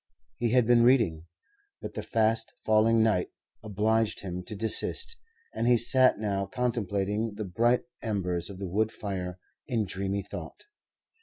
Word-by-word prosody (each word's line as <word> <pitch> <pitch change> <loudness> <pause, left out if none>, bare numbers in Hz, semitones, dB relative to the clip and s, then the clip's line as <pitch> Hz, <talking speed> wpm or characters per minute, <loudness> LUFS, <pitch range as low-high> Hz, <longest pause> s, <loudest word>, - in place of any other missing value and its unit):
He 120 - 0
had 125 0 +3
been 120 0 +5
reading, 115 -10 +3 0.5
but - - -7
the - - -4
fast 115 0 0
falling 110 +1 +4
night 105 -5 +1 0.3
obliged 110 +2 0
him 90 -2 -5
to 110 - -5
desist, 115 - +2 0.4
and 115 - -1
he 120 -1 +5
sat 130 +2 +4
now 100 -2 -2
contemplating 105 -2 -2
the 105 0 -4
bright 115 +7 +1 0.2
embers 90 -5 -2
of 100 - -9
the 95 0 -5
wood 110 +5 0
fire 95 -4 -5 0.3
in 115 -5 0
dreamy 100 +1 -3
thought. - - -9
110 Hz, 150 wpm, -28 LUFS, 95-115 Hz, 0.5 s, been